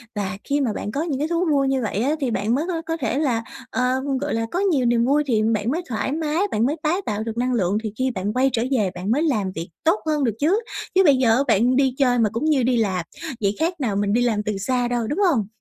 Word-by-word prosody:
Và 195 -2 -3
khi 285 0 0
mà 230 -6 0
bạn 210 - -4
có 280 - -2
những 285 -6 -2
cái 300 - 0
thú 340 +2 0
vui 275 -2 +2
như 265 -1 +1
vậy 210 -2 -2
á 290 +3 +1
thì 265 -5 -1
bạn 215 +4 0
mới 300 - -1
có 335 -3 -2
có 325 0 -3
thể 265 0 -1
là, 240 -7 0 0.3
ờ, 255 0 0 0.2
gọi 290 - -2
là, 225 0 0
có 360 - -1
nhiều 320 -11 +2
niềm 235 0 +3
vui 290 +3 +3
thì 220 -4 +2
bạn 215 +3 0
mới 335 +5 -1
thoải 245 +3 -2
mái, 310 +1 -1
bạn 220 +2 +1
mới 285 +4 0
tái 340 +5 +1
tạo 210 0 -2
được 225 0 -5
năng 250 +1 0
lượng, 195 -3 +1
thì 215 - -3
khi 260 0 +1
bạn 200 0 -3
quay 265 +2 +3
trở 230 - +1
về 210 -8 +1
bạn 185 +4 -3
mới 295 +6 +2
làm 215 - 0
việc 165 +1 -5
tốt 330 +6 +3
hơn 300 -2 0
được 230 - +1
chứ. 350 +9 +3 0.4
Chứ 380 - +6
bây 285 -5 +6
giờ 250 +1 +3
bạn 235 +3 +3
đi 265 -1 +2
chơi 250 -3 +3
mà 220 -2 +3
cũng 230 +7 -2
như 295 -5 +3
đi 250 0 +2
làm, 190 -6 0 0.4
vậy 200 0 +1
khác 335 +1 -1
nào 225 -7 -1
mình 200 0 0
đi 240 - +3
làm 220 -4 +1
từ 210 -2 -2
xa 245 +5 0
đâu, 240 -2 -1
đúng 295 - -2
hông? 215 -8 0
250 Hz, 285 wpm, -22 LUFS, 215-290 Hz, 0.4 s, Chứ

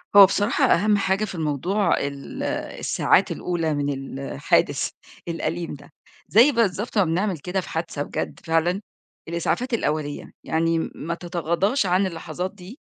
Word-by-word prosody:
هو 200 - +12
بصراحة 205 +8 +2
أهم 210 -1 +4
حاجة 195 +1 +1
في 195 - -7
الموضوع 170 +5 +1
ال 140 -1 -5 0.4
الساعات - - +2
الأولى 165 -3 -1
من 140 -2 -3
الحادث - - +2 0.4
الأليم 170 0 -3
ده. 145 0 -12 0.4
زي 240 +8 +6
بالضبط 225 -2 0
ما 200 - +6
بنعمل 180 +3 0
كده 180 +6 -2
في - - -10
حادثة 160 -3 -3
بجد - - -4
فعلًا 170 +4 +1 0.5
الإسعافات 170 +9 -1
الأولية، 150 -8 -2
يعني 165 +1 +1
م - - -2
ما 170 +2 -3
تتغاضىش 175 - 0
عن 185 +2 +2
اللحظات 180 +2 -5
دي 205 - -12
175 Hz, 145 wpm, -24 LUFS, 160-200 Hz, 0.5 s, هو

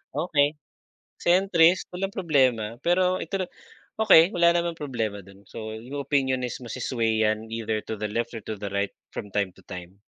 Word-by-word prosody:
Okey. 150 -3 +2 0.7
Centrist, 175 -1 +4
walang 195 +2 -3
problema. 130 - +1
Pero 180 +1 +3
ito 195 -1 -3 0.6
okey 170 -5 +7
wala 170 -1 +5
namang 170 -1 -1
problema 110 -8 -3
dun. 100 +1 -17
So, 110 -1 -6
yung 135 +5 -6
opinion 130 -3 +1
is 125 - -4
maswe-sway 115 -2 0
'yan 110 +1 -1
either 110 -1 -2
to 110 - -4
the - - 0
left 115 +2 -2
or - - -7
to 110 - -3
the 100 0 -5
right 100 0 -1 0.2
from 105 - -6
time 100 -2 +1
to - - -16
time. 90 +1 -9
125 Hz, 170 wpm, -26 LUFS, 110-170 Hz, 0.7 s, okey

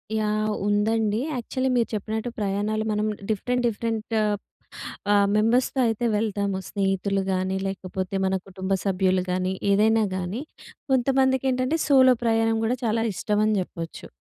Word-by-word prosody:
Yeah! 215 0 0
ఉందండి. 210 +1 +1 0.2
Actually 260 +2 -2
మీరు 235 - +2
చెప్పినట్టు 220 +3 -3
ప్రయాణాలు 205 +2 -1
మనం 210 0 0 0.2
డిఫరెంట్, 245 +4 0
డిఫరెంట్ 225 0 -3 1.0
ఆహ్, 200 -1 +4
మెంబర్స్‌తో 235 +5 +2
అయితే 225 +2 -1
వెళ్తాము. 200 -2 -1
స్నేహితులు 195 0 0
గానీ, 185 +1 -1
లేకపోతే 190 0 -4
మన 190 0 +1
కుటుంబ 190 0 -3
సభ్యులు 185 -1 +2
గానీ, 185 +1 0 0.2
ఏదైనా 220 +2 +4
గానీ, 185 +6 -3 0.5
కొంతమందికేంటంటే, 265 +1 +2
సోలో 260 -3 +6
ప్రయాణం 225 -1 +2
కూడా 245 +3 0
చాలా 225 0 +1
ఇష్టం 210 +3 0
అని 215 - +2
చెప్పొచ్చు. 165 -2 -7
215 Hz, 125 wpm, -25 LUFS, 195-230 Hz, 1.0 s, సోలో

